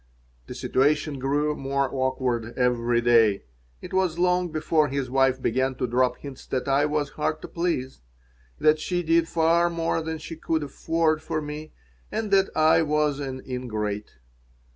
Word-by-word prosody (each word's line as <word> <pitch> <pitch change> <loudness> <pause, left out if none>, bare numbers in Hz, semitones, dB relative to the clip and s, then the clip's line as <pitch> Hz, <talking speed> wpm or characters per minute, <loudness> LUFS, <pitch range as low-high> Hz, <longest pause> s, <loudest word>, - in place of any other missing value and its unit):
The - - -7
situation 145 +1 +1
grew 145 +3 0
more 140 0 -1
awkward 130 -3 -1
every 120 -1 +2
day. 115 -4 +4 0.4
It - - -8
was 185 -3 +1
not 175 - +1
long 180 -1 +1
before 155 0 +1
his 135 -2 -3
wife 135 0 +3
began 130 +2 0
to 125 - -1
drop 125 +1 +1
hints 140 -2 -10
that 130 0 -2
I 140 +2 +3
was 150 -1 -1
hard 155 +1 -2
to - - -5
please, 165 - -2 0.6
that 155 0 +3
she 175 +3 -2
did 165 0 +3
far 170 +1 +3
more 165 -1 -1
than 160 0 -4
she 165 - -8
could 160 -1 -1
afford 155 +2 0
for 160 0 -2
me 150 +1 -7 0.4
and 215 -2 -3
that 195 0 +4
I 160 +1 +5
was 150 -2 +1
an 130 -2 -5
ingrate. 110 - -4
145 Hz, 165 wpm, -25 LUFS, 130-160 Hz, 0.6 s, I